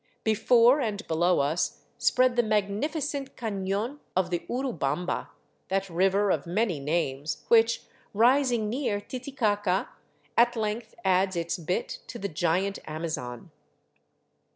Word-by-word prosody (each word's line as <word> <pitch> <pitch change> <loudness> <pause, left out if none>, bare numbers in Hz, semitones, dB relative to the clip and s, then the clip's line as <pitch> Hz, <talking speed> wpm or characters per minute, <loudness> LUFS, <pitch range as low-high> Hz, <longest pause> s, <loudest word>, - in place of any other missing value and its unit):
Before 235 +5 +5
and 215 -3 -2
below 170 +1 +2
us 150 +5 -1 0.2
spread 255 -1 +3
the 240 - +5
magnificent 270 - -1
caiion 210 +4 -2 0.2
of 180 -1 +1
the 175 - +1
Urubamba, 180 - -2 0.4
that 195 -1 -1
river 195 +3 +2
of 155 -2 -1
many 185 -2 0
names 145 -1 -2
which, 230 0 +4 0.3
rising 240 0 +3
near 230 -3 -1
Titicaca, 210 -6 -1 0.5
at 240 +1 +4
length 220 +1 -3
adds 190 0 +3
its 170 +1 -2
bit 175 +2 -2
to - - -7
the 200 - -3
giant 175 +5 0
Amazon. 155 -7 -5
200 Hz, 120 wpm, -27 LUFS, 175-235 Hz, 0.5 s, Before